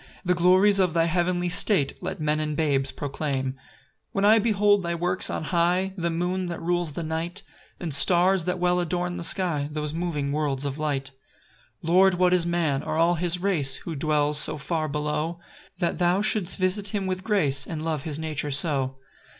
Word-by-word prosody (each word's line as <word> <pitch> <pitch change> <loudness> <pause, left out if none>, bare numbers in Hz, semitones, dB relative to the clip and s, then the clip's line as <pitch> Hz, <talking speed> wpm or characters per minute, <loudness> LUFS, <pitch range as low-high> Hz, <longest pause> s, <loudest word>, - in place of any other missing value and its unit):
The 180 - +2
glories 185 +3 +4
of 180 -3 +1
thy 165 -1 +3
heavenly 175 +1 0
state 175 -4 +2
Let 185 0 -5
men 155 0 0
and 150 -1 -3
babes 140 -4 +1
proclaim. 140 -2 -3
2 - - -23 0.6
When 195 0 0
I 220 +2 +6
behold 205 -2 +2
thy 170 -1 -3
works 180 +2 +2
on - - -3
high, 180 +3 0
The 170 -3 -2
moon 180 +2 -2
that 170 -1 -5
rules 175 -2 -1
the 170 - -5
night, 165 +5 -3 0.4
And 165 -4 -4
stars 180 +4 +3
that 180 0 -1
well 180 0 +1
adorn 175 +1 -2
the - - -5
sky, 165 -5 +2
Those 150 0 -4
moving 160 -4 -3
worlds 145 -2 -1
of 140 +1 -4
light; 140 -3 -2 0.7
3 165 - 0
Lord, 190 +1 +5
what 180 0 +2
is 175 -2 +3
man, 165 -5 0
or - - -4
all 165 +2 +3
his 175 +1 0
race, 170 -8 +2
Who 165 - -7
dwells 150 0 +1
so 150 - +2
far 155 +2 -2
below, 150 +3 -3 0.4
That 175 0 -1
thou 180 +3 +2
shouldst 215 -4 +1
visit 190 +2 -1
him 200 -1 -3
with 185 0 -3
grace, 150 -11 +1
And 155 -2 -5
love 160 -3 -2
his 150 0 -5
nature 155 -2 -3
so? 135 -2 +1
170 Hz, 195 wpm, -25 LUFS, 150-180 Hz, 0.7 s, I